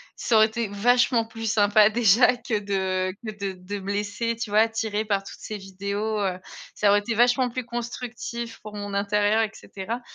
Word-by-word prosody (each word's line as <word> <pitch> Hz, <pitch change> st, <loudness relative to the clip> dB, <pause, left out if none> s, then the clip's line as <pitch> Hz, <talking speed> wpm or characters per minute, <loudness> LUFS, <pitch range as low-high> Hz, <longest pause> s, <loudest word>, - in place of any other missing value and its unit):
ça 235 Hz, -, 0 dB
aurait 220 Hz, -, +7 dB
été 230 Hz, 0 st, -3 dB
vachement 240 Hz, +3 st, +3 dB
plus 225 Hz, -1 st, -4 dB
sympa 210 Hz, 0 st, +5 dB
déjà 235 Hz, +2 st, +4 dB
que 225 Hz, -4 st, -2 dB
de 190 Hz, -2 st, -1 dB
que 215 Hz, -, -3 dB
de 200 Hz, -2 st, -3 dB
de 185 Hz, +3 st, -7 dB
me 195 Hz, +1 st, -4 dB
laisser, 210 Hz, +3 st, -2 dB
tu 230 Hz, -1 st, -5 dB
vois, 215 Hz, +2 st, +5 dB
tirée 220 Hz, -1 st, -2 dB
par 200 Hz, -2 st, 0 dB
toutes -, -, -11 dB
ces 215 Hz, -, -5 dB
vidéos. 200 Hz, +3 st, -3 dB
Heu, 185 Hz, -2 st, -1 dB, 0.4 s
ça 205 Hz, -, +3 dB
aurait 205 Hz, +1 st, +5 dB
été 225 Hz, +2 st, -3 dB
vachement 245 Hz, +2 st, +3 dB
plus 245 Hz, 0 st, -5 dB
constructif 235 Hz, -1 st, -5 dB
pour 210 Hz, 0 st, -9 dB
mon 205 Hz, -1 st, -5 dB
intérieur 205 Hz, +2 st, +2 dB
et 215 Hz, -, -3 dB
cetera. 220 Hz, +6 st, -6 dB
215 Hz, 195 wpm, -25 LUFS, 200-230 Hz, 0.4 s, aurait